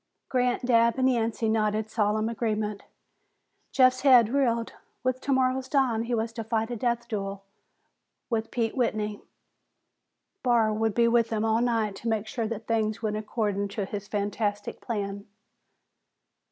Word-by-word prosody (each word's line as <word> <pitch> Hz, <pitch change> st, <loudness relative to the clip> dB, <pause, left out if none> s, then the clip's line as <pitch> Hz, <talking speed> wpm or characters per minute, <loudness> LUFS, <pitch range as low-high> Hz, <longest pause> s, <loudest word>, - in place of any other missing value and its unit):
Grant, 250 Hz, -1 st, +1 dB
Dabb 235 Hz, -1 st, +4 dB
and 260 Hz, 0 st, +3 dB
Yancey 230 Hz, -2 st, 0 dB
nodded 215 Hz, 0 st, +1 dB
solemn 215 Hz, 0 st, +1 dB
agreement. 215 Hz, -2 st, -2 dB, 0.9 s
Jeff's 255 Hz, -1 st, +4 dB
head 250 Hz, -5 st, +6 dB
reeled. 235 Hz, -3 st, 0 dB, 0.3 s
With 255 Hz, 0 st, 0 dB
tomorrow's 260 Hz, -1 st, +1 dB
dawn, 250 Hz, -5 st, +1 dB
he 240 Hz, 0 st, -1 dB
was 225 Hz, 0 st, -2 dB
to 225 Hz, -1 st, -5 dB
fight 225 Hz, +1 st, -1 dB
a -, -, -2 dB
death 235 Hz, +1 st, -1 dB
duel 195 Hz, -3 st, -4 dB, 0.8 s
with 225 Hz, -2 st, -2 dB
Pete 230 Hz, -2 st, -1 dB
Whitney. 215 Hz, -4 st, -1 dB, 1.2 s
Barr 235 Hz, -4 st, +3 dB
would 220 Hz, 0 st, 0 dB
be 235 Hz, -1 st, +4 dB
with 235 Hz, -1 st, +3 dB
them 220 Hz, -1 st, -1 dB
all 225 Hz, +1 st, +2 dB
night 225 Hz, -4 st, 0 dB
to 235 Hz, -, -6 dB
make 220 Hz, -1 st, 0 dB
sure 225 Hz, 0 st, -3 dB
that 225 Hz, 0 st, -5 dB
things 220 Hz, -1 st, -1 dB
went 210 Hz, -1 st, -1 dB
according 210 Hz, -2 st, -1 dB
to 200 Hz, 0 st, -4 dB
his 205 Hz, +1 st, -6 dB
fantastic 205 Hz, 0 st, -2 dB
plan. 200 Hz, -3 st, -4 dB
225 Hz, 150 wpm, -27 LUFS, 215-240 Hz, 1.2 s, head